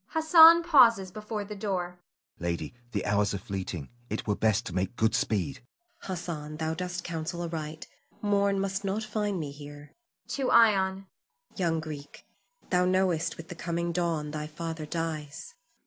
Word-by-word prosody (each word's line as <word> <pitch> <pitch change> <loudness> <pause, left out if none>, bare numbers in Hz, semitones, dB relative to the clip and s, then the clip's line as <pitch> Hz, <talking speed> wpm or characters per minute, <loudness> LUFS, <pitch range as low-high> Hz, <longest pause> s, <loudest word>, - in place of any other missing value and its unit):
[Hassan 325 +1 +8
pauses 235 - +5
before 210 +1 -5
the 210 +1 -7
door.] 180 -4 -3 0.4
Hassan. - - -10
Lady, 85 -1 -2 0.2
the 100 -4 -2
hours 105 0 +1
are - - -1
fleeting. 95 -6 -5 0.2
It - - -3
were 105 - +1
best 110 -2 +1
to 90 - -6
make 95 +5 -1
good 110 -1 +2
speed. 110 +6 0 0.4
Zuleika. - - -16
Hassan, 165 -5 -5
thou 160 0 -1
dost 180 +1 -4
counsel 170 +1 -4
aright; 155 -2 -5 0.3
morn 200 -1 +2
must 195 0 -2
not 200 +3 -1
find 210 -3 -2
me 150 -3 -4
here. 145 0 -11 0.4
[To 270 -3 -1
Ion.] 195 -5 +4 0.5
Young 170 -4 0
Greek, 150 -2 -8 0.5
thou 180 0 +3
knowest 180 -3 +1
with 165 0 -10
the - - -5
coming 170 0 -2
dawn 165 -4 -1
thy 150 0 -4
father 160 0 -5
dies. 160 - -4
170 Hz, 165 wpm, -28 LUFS, 150-195 Hz, 0.5 s, Hassan